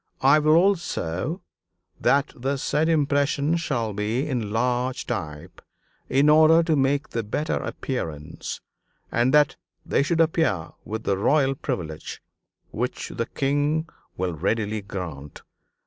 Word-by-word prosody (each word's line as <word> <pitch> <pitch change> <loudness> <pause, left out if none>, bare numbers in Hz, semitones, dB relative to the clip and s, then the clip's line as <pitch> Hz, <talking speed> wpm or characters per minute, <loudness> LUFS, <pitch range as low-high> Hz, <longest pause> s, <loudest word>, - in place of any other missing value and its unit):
I 140 +3 +6
will 155 +1 +4
also 170 - 0 0.6
that 140 +1 +2
the 135 +3 -2
said 150 +4 0
impression 145 0 +2
shall 120 -10 -1
be 110 +7 -1
in 120 -7 -2
large 125 +3 0
type, 75 -11 -5 0.5
in 140 +2 +3
order 160 +2 +6
to 165 -2 +2
make 140 +1 +1
the 115 - -2
better 130 +8 -2
appearance, 80 - -5 0.5
and 120 +2 +2
that 150 -7 +4 0.3
they - - +2
should 165 +4 0
appear 160 - +1 0.2
with 110 +1 -4
the 95 -1 0
Royal 135 +4 +3
Privilege, 80 - -5 0.5
which 125 +3 -3
the 115 -1 -3
King 145 +3 0 0.3
will 90 -1 -1
readily 105 +6 -1
grant. 85 -8 -7
130 Hz, 130 wpm, -24 LUFS, 105-150 Hz, 0.6 s, I